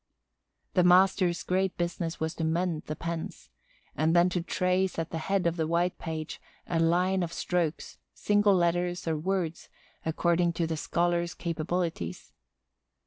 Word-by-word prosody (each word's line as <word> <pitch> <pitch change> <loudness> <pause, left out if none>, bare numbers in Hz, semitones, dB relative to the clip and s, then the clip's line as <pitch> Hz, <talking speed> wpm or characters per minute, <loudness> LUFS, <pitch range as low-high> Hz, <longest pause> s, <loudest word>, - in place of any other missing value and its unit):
The 180 - +4
master's 180 0 +4
great 190 0 0
business 170 -1 -2
was 160 +1 -1
to 165 - -4
mend 165 0 0
the 155 - -3
pens—and 160 - -4
then 175 +1 +5
to 180 -1 -1
trace 185 +2 0
at 165 0 -3
the 165 - -3
head 195 +3 0
of 170 0 +1
the 160 -1 0
white 170 +2 0
page 160 -2 -5 0.2
a 165 - -1
line 180 +3 +2
of 170 -2 -2
strokes, 170 -3 -2
single 205 -1 +3
letters, 175 0 0
or 160 - +1
words, 170 0 -2 0.3
according 170 +1 +1
to 170 0 0
the 160 0 -2
scholar's 170 +2 0
capabilities. 165 - -3
170 Hz, 145 wpm, -28 LUFS, 165-180 Hz, 0.3 s, then